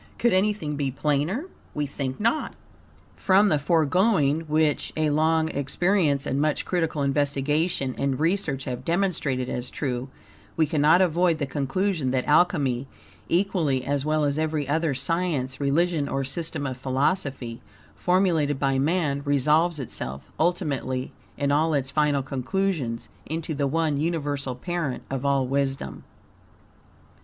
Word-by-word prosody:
Could 240 -4 +2
anything 185 -6 0
be 140 -2 0
plainer? 150 - -1 0.3
We 150 - 0
think 135 -2 -4
not. 230 +8 0 0.6
From 200 +2 +4
the 150 -4 +2
foregoing, 160 +1 +2
which 155 -1 +1
a 155 -1 +2
long 160 +1 +2
experience 145 0 +1
and 135 +2 0
much 155 -1 0
critical 165 -5 -1
investigation 145 +1 0
and 140 -2 0
research 160 -5 0
have 125 -1 -5
demonstrated 165 -7 0
as 125 0 -3
true, 130 -2 -3 0.5
we 160 - +4
cannot 155 +3 +4
avoid 175 -1 +3
the 145 - -1
conclusion 145 +3 -1
that 130 0 0
Alchemy, 145 -5 +2 0.4
equally 165 -8 +1
as 140 -1 0
well 155 0 +1
as 145 +1 0
every 155 -3 -1
other 155 0 0
science, 140 -2 -1
religion, 145 +1 +1
or 135 - -1
system 155 +2 -3
of 130 -2 -3
philosophy 130 -2 -1 0.3
formulated 175 -6 +2
by 135 -1 +1
man, 150 -1 +1
resolves 150 +4 +2
itself, 70 - -4 0.2
ultimately, 140 -6 -1 0.3
in 140 -1 0
all 155 +2 +2
its 135 -1 -1
final 145 -1 +2
conclusions, 135 -2 -2 0.2
into 160 +1 -3
the 140 -1 0
one 155 0 0
universal 145 -5 -2
parent 155 -3 -3
of 135 -1 -2
all 140 -2 +2
wisdom. 135 - -2
145 Hz, 135 wpm, -25 LUFS, 135-165 Hz, 0.6 s, From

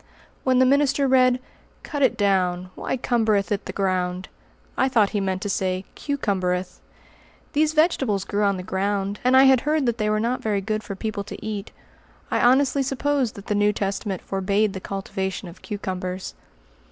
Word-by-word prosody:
When 260 -1 +3
the 260 - +5
minister 280 +1 +3
read, 255 -1 +4 0.4
"Cut 290 -2 -4
it 265 - +3
down: 185 -3 +1
why - - -3
cumbereth 220 -4 +1
it 200 - -1
the - - -3
ground?"? 185 -1 -1 0.5
I 260 - +2
thought 220 -6 +3
he 210 - 0
meant 190 0 -2
to - - -2
say 185 -1 -1
"cu 285 -1 -3
cumbereth." 185 -5 -1 0.7
These 310 +1 +2
vegetables 270 - +2
grew 205 - -1
on 200 -2 +2
the 180 - -6
ground, 200 +2 -1
and 255 +1 +5
I 265 - +8
had 265 -2 +6
heard 300 -1 +1
that 235 -1 0
they 210 0 +1
were 215 0 +1
not 240 +3 -1
very 210 -2 0
good 215 +2 -2
for 200 - -6
people 205 0 -3
to 205 - -8
eat. 210 -1 -4 0.6
I - - +2
honestly 265 +2 +4
supposed 270 -2 0
that 200 - -10
the - - -1
New 205 0 +3
Testament 195 -1 -3
forbade 200 +2 0
the 190 - -5
cultivation 190 0 -4
of 170 - -12
cucumbers. 185 -3 -4
210 Hz, 185 wpm, -23 LUFS, 195-255 Hz, 0.7 s, I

